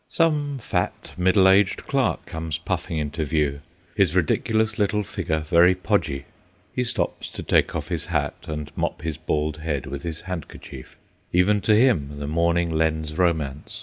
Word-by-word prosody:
Some 150 -4 +1
fat, 125 - -3
middle 95 +2 +4
aged 95 0 +3
clerk - - 0
comes 80 -1 -4
puffing 85 0 -3
into 75 +1 -2
view: 75 -2 0 0.3
his 95 -4 +2
ridiculous 110 +6 +1
little 105 +1 +1
figure 80 -4 -2
very 85 +3 +5
podgy. 70 -6 -1 0.5
He 125 - 0
stops 120 - -2
to - - -7
take - - +2
off - - -4
his - - -1
hat - - -2
and 75 -1 -5
mop - - -2
his 80 -2 -3
bald 75 -1 -1
head 75 -4 -3
with 70 +1 -6
his 80 0 -4
handkerchief: 85 -7 -8 0.3
even 100 +4 +3
to 105 +3 +4
him 85 - +2
the 70 - -4
morning 85 +2 +1
lends 80 -1 0
romance. 80 -5 -1
85 Hz, 160 wpm, -24 LUFS, 75-95 Hz, 0.5 s, very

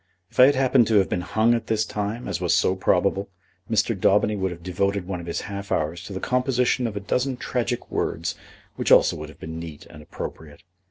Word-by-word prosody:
If - - -9
I 130 - +10
had 140 - +3
happened 130 -3 +4
to 110 - +2
have 100 -2 +4
been 90 - -1
hung 110 +6 +2
at 115 -2 -2
this 110 0 +1
time, 105 +4 -4
as - - -3
was 90 -1 +2
so 95 +1 +2
probable, 95 +1 +1 0.4
Mr. 115 +1 +2
Daubeny 100 +2 +3
would 95 -1 -1
have 85 -1 -9
devoted 100 +1 -1
one 90 -1 -4
of 85 - -9
his 85 - -2
half 100 0 -7
hours 80 +3 -1
to 100 - -7
the 95 - -4
composition 125 0 +1
of 105 -2 -5
a - - -3
dozen 125 +6 -1
tragic 120 -1 -3
words - - -1 0.4
which - - -1
also - - +6
would 75 0 -7
have 75 - -15
been 80 +1 -6
neat 80 -3 -9
and 75 - -12
appropriate. 75 0 -8
100 Hz, 225 wpm, -24 LUFS, 90-115 Hz, 0.4 s, I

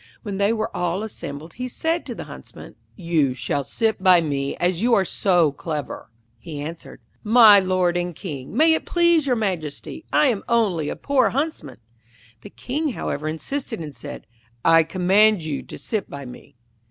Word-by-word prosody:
When 205 -4 -4
they 200 +2 +2
were 220 -1 -2
all 180 +3 -1
assembled, 160 -6 -7
he 250 0 -5
said 325 +6 -2
to - - -5
the - - -6
Huntsman, - - -12 0.2
'You 160 -8 0
shall 140 +2 -2
sit 220 - -1
by 185 -2 +6
me 140 -4 -2
as 175 0 0
you 235 0 +4
are 195 - +2
so 175 -5 +2
clever.' 150 -5 -6 0.3
He 150 +4 -8
answered, 160 +3 -8 0.2
'My 220 -2 +8
lord 185 -2 +1
and 175 -1 -2
King, 150 - -7
may 320 +2 +5
it 320 - -2
please 340 -4 +3
your 250 - +2
Majesty, 185 - -4
I 300 -2 +4
am 220 -5 -1
only 195 -10 +1
a - - -4
poor 280 -2 +2
Huntsman!' 275 - -3 0.6
The - - -11
King, 290 +2 -3
however, 150 -6 -4
insisted, 225 - -4
and 150 -4 -7
said, 115 - -9 0.4
'I 165 -1 +6
command 190 +3 +3
you 155 -3 -3
to - - -10
sit 215 -4 -3
by 140 -1 -8
me.' 125 - -12
185 Hz, 175 wpm, -22 LUFS, 155-230 Hz, 0.6 s, My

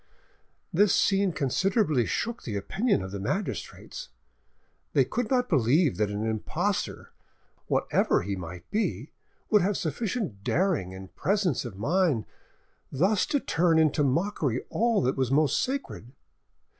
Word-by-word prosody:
This 200 +3 +4
scene 195 -1 +2
considerably 155 - +1
shook 235 +1 -2
the 110 - -5
opinion 195 - 0
of 95 - -6
the 100 - -5
magistrates. 200 - -4 0.8
They - - +4
could 245 -2 -2
not 250 -1 +2
believe 145 - +3
that 105 -1 +1
an 105 +2 -3
impostor, 110 -1 -2 0.6
whatever - - +1
he 100 +1 -2
might 90 -1 -8
be, 145 - -1 0.4
would 210 -2 +6
have 195 +3 +1
sufficient 180 - -3
daring 160 - 0
and 95 0 -11
presence 190 - 0
of 105 -6 -7
mind 150 - +1 0.7
thus 185 +8 +2
to 285 - +1
turn 165 -6 +2
into 155 -2 +3
mockery 140 - 0
all 230 - +1
that 130 +2 0
was 130 -2 +1
most 145 +2 +3
sacred. 260 - -4
155 Hz, 135 wpm, -27 LUFS, -, 0.8 s, would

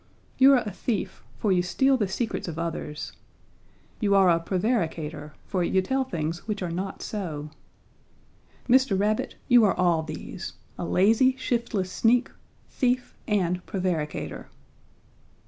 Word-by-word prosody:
You 270 +1 +8
are 250 -3 +4
a 210 - -3
thief, 210 +2 -3
for 210 - 0
you 180 -1 +4
steal 265 +10 +2
the 215 -6 0
secrets 220 +3 -3
of 165 -2 -5
others. 155 -3 -4 0.9
You 200 -3 +2
are 190 -2 +6
a 165 - +3
prevaricator, 165 -6 -2
for 185 -2 -1
you 190 - +2
tell 265 +6 0
things 165 -5 -4
which 210 -3 -2
are 175 - -3
not 190 +3 -4
so. 155 -8 -5 1.2
Mr. 250 -6 +4
Rabbit, 210 +2 0
you 245 -2 +6
are 205 - +3
all 175 -3 +2
these 160 +3 -7 0.2
a - - -4
lazy, 225 +9 +4
shiftless 235 -7 -1
sneak, 240 +5 +2 0.4
thief 250 -1 -1
and 180 -4 0
prevaricator.' 180 -6 -3
190 Hz, 140 wpm, -26 LUFS, 170-235 Hz, 1.2 s, You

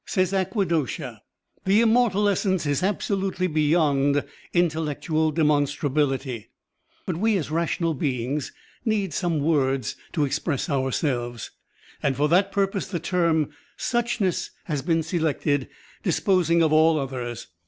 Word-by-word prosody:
Says 185 -1 0
Agvaghosha, 185 - -1 0.4
"The 195 +3 +4
Immortal 225 -3 +3
Essence 190 -3 +1
is 145 -2 0
absolutely 195 -1 -1
beyond 150 -3 +2 0.3
intellectual 160 -2 0
demon 150 -2 +3
strabiUty, 135 -5 -1 0.6
but 175 -4 -2
we 215 +2 +2
as 155 -4 -4
rational 165 0 0
beings 135 0 -2 0.3
need 205 -7 0
some 170 -2 0
words 135 -6 +1 0.2
to 150 -4 +2
express 145 +2 -2
ourselves, 130 -3 -1 0.5
and 135 -1 0
for 145 +1 +3
that 185 +4 +3
purpose 195 0 0
the 180 -3 -3
term 165 -3 +1 0.3
*suchness* 235 -6 0
has 150 -5 -2
been 165 +3 +1
selected, 155 -4 0 0.3
disposing 175 -2 +2
of 155 -1 +2
all 160 +1 +5
others." 125 -4 -4
160 Hz, 120 wpm, -24 LUFS, 145-185 Hz, 0.6 s, all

